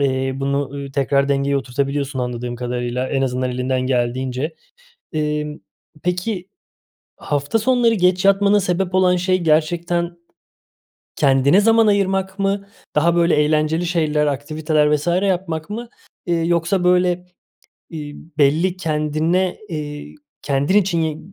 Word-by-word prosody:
eee, 130 -1 0
bunu, 140 0 -1
ııı, 140 -1 -7
tekrar 140 0 +1
dengeye 140 0 +1
oturtabiliyorsun, 140 +1 -2
anladığım 125 -1 -3
kadarıyla, 125 +1 -3
en 135 -1 0
azından 130 -1 -1
elinden 125 +1 -1
geldiğince. 130 +4 -1 0.6
Emm, 150 -1 -2 0.5
peki, 180 +1 -2 0.7
hafta 145 +9 -1
sonları 240 0 +3
geç 180 -1 +2
yatmana 200 +1 +4
sebep 185 -1 -1
olan 185 -1 +4
şey 185 +1 +1
gerçekten 170 +2 0 1.0
kendine 140 +5 +4
zaman 225 +1 +4
ayırmak 195 -1 +1
mı? 200 0 -1 0.3
Daha, 170 +3 +3
böyle, 170 0 +3
eğlenceli 155 +3 +1
şeyler, 155 -3 +1
aktiviteler 150 +1 +1
vs. 150 +3 -7
yapmak 180 -2 0
mı, 235 +3 -5 0.4
eee, 175 - +1
yoksa 170 +2 +1
böyle, 180 0 +4 0.8
ııı, 160 - -4 0.4
belli 160 +6 +2
kendine, 160 +2 0
eee, 150 -3 -6 0.3
kendin 145 +7 +1
için 180 -4 +2
yi 155 -1 -2
155 Hz, 125 wpm, -20 LUFS, 140-180 Hz, 1.0 s, yatmana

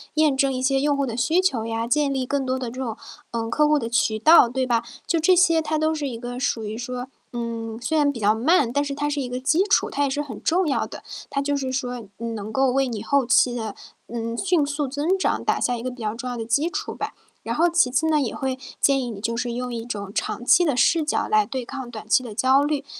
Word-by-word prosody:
验 305 -3 +3
证 270 -1 +2
一 255 - -3
些 270 +1 +2
用 290 0 +2
户 280 -1 0
的 230 0 -4
需 325 +9 +2
求 250 -12 0
呀， 230 0 -2
建 285 +1 +2
立 260 -1 -1
更 275 +1 -1
多 260 0 -1
的 245 -2 -4
这 255 +3 -9
种， 230 -4 -3 0.4
嗯， 225 -1 -3
客 300 +5 +3
户 300 -1 +3
的 230 - -4
渠 220 -2 +1
道， 315 -1 +7
对 255 +2 -2
吧？ 235 -1 +1 0.2
就 335 - +1
这 360 +3 +4
些 335 -2 +4
它 310 0 -1
都 315 0 +1
是 290 -2 -3
一 230 -3 -5
个 245 0 -6
属 230 -4 -1
于 215 +1 -5
说， 250 +1 -5 0.3
嗯， 230 -1 -4
虽 315 +5 0
然 290 -1 +3
比 230 - -7
较 210 +1 +3
慢， 270 0 +3
但 285 +2 0
是 280 - -3
它 290 +1 -2
是 290 -1 -1
一 255 - -3
个 250 +1 -4
基 310 +8 +2
础， 410 - +2
它 285 - -1
也 280 - +1
是 290 +2 -1
很 260 -8 -7
重 355 +1 +2
要 275 - 0
的。 - - -9 0.3
它 280 - 0
就 285 0 0
是 260 -1 -3
说 250 -2 -3 0.2
能 220 -2 -5
够 265 +1 +3
为 270 0 +1
你 220 -4 -4
后 280 +3 +1
期 245 0 +3
的， 220 -3 -4 0.3
嗯， 230 0 -4
迅 355 -3 +2
速 285 0 -2
增 295 +8 0
长 - - 0
打 - - +1
下 245 - +1
一 230 - -6
个 255 - -3
比 250 -1 -11
较 215 -1 -2
重 250 +2 -5
要 245 - -4
的 225 - -4
基 285 +9 +1
础 410 +3 -4
吧。 - - -5 0.3
然 - - -3
后 340 +2 +4
其 340 -7 +3
次 305 +5 +1
呢， 305 -2 +3
也 235 - -2
会 260 -1 -3 0.2
建 275 -1 +3
议 245 - -4
你 205 -3 -7
就 230 +2 -2
是 240 0 -2
用 245 0 -4
一 230 -1 -4
种 205 -4 -5
长 240 - -3
期 350 - +6
的 285 -7 +1
视 320 +6 +3
角 300 - 0
来 215 0 +4
对 250 +3 -5
抗 260 -1 -7
短 215 -2 -9
期 255 +4 +4
的 225 -4 -8
焦 265 +3 +4
虑， 290 -1 -1
260 Hz, 295 characters per minute, -23 LUFS, 235-290 Hz, 0.4 s, 道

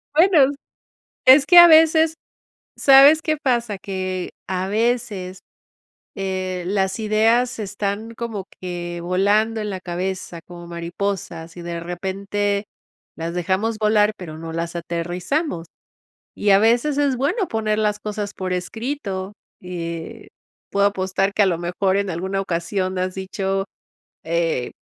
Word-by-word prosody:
Bueno, 315 -5 +5 0.7
es 270 +2 +7
que 350 +3 +5
a 345 0 +12
veces, 320 0 +5 0.6
¿sabes 280 +3 +7
qué 310 -1 0
pasa? 240 -7 0
Que 185 -1 -4 0.2
a 185 0 -2
veces, 205 -4 -1 0.7
eh, 185 -2 -3
las 190 +1 0
ideas 225 +4 +2
están 205 +2 -3
como 225 -5 -5
que 175 -1 -5
volando 205 +5 +1
en 210 - -3
la 190 -2 -4
cabeza 180 -1 -4
como 175 -1 -11
mariposas, 170 -1 -4
y 175 - -8
de 170 0 -5
repente 200 +4 -2 0.5
las 165 +1 -4
dejamos 190 +6 -1
volar, 210 0 +3
pero 160 -4 -8
no 165 0 -7
las 170 +1 -4
aterrizamos. 175 - -3 0.7
Y 205 - +1
a 195 - +6
veces 240 +6 +2
es 280 -3 +1
bueno 345 - 0
poner 215 -1 -1
las 210 -1 0
cosas 210 -1 -4
por 185 -1 -3
escrito, 200 0 -4 0.3
eh, 170 -2 -6 0.4
puedo 200 0 +3
apostar 195 0 -1
que 210 - +2
a 205 - +6
lo 175 -3 +1
mejor 185 +3 0
en 200 -1 -1
alguna 190 +3 -2
ocasión 185 +1 -2
has 185 0 -2
dicho: 195 0 -2 0.6
"Eh, 165 -6 -1
195 Hz, 135 wpm, -21 LUFS, 180-225 Hz, 0.7 s, a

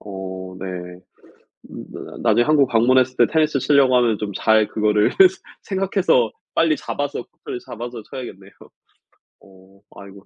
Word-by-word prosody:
어 95 -2 -8
네 90 -1 -7 0.7
음 - - -9
나 - - -10
나중에 120 - +3
한국 145 -2 +3
방문했을 130 +2 +2
때 120 - +5
테니스 155 -2 +1
치려고 135 -1 +3
하면 120 -4 +2
좀 105 -1 -4
잘 110 -1 +2
그거를 105 -1 +1 0.5
생각해서 190 - +1 0.2
빨리 160 -2 +2
잡아서 145 -3 -4
코트를 120 - -9
잡아서 120 0 -8
쳐야겠네요. 100 -7 -9 0.9
어 95 0 -21 0.2
아이고. 100 0 -13
115 Hz, 300 characters per minute, -20 LUFS, 100-130 Hz, 0.9 s, 때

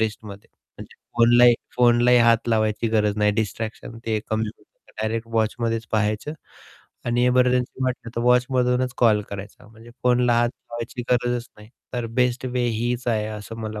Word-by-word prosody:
रिस्टमध्ये 105 -2 -4 0.7
फोनलाही 120 +1 +6 0.2
फोनलाही 120 0 +5
हात 115 0 +3
लावायची 110 0 +1
गरज 105 -2 +1
नाही. 105 0 +3
डिस्ट्रॅक्शन 110 +2 -4
ते 110 - 0
एक 105 - -4
कमी 110 0 0
होतं. - - -26 0.4
डायरेक्ट 110 +1 -2
वॉचमध्येच 115 0 -1
पाहायचं 110 +6 0 0.7
आणि 120 +1 +1
एमर्जन्सी 125 +1 +1
वाटली 125 -2 -3
तर - - 0
वॉचमधूनच 125 0 +2
कॉल 110 -3 +4
करायचा 100 +1 -9
म्हणजे 115 +1 -16
फोनला 125 -1 +3
हात 120 - +2 0.2
लावायची 120 +1 -5
गरजच 120 0 0
नाही. 105 +1 -14 0.2
तर 120 -2 -3
बेस्ट 125 +1 +1
वे 125 -1 -1
हीच 120 +2 -2
आहे 110 -2 0
असं 110 +1 -8
मला 110 -1 -5
115 Hz, 150 wpm, -23 LUFS, 110-125 Hz, 0.7 s, फोनलाही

